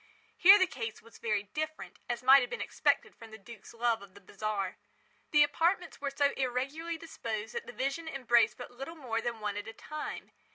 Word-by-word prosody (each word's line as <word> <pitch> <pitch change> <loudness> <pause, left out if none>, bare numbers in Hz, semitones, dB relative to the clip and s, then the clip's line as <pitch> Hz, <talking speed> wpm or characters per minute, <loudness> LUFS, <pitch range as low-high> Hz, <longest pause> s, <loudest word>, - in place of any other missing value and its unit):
Here 390 +3 +9
the 375 - +4
case 230 -10 -6
was 230 - -16
very 210 -3 0
different, 310 +9 -5
as 240 0 -2
might 270 +2 +8
have 245 - -2
been 475 - -4
expected - - +1
from 225 - -13
the 220 - -10
duke's 220 +1 -12
love 235 -1 0
of 200 -1 -14
the - - -12
bizarre. 200 -1 -3 0.5
The 295 -1 +6
apartments 335 +5 0
were 285 - -1
so 280 +1 +2
irregularly 275 +6 -2
disposed 225 -9 -5
that 470 - -5
the - - -6
vision 275 - -2
embraced 240 -6 +3
but 245 - -8
little 270 +7 -8
more 240 -7 -2
than 230 -1 -3
one 205 -1 -2
at 205 - -5
a 225 - -7
time. 305 +5 -7
245 Hz, 205 wpm, -31 LUFS, 225-305 Hz, 0.5 s, Here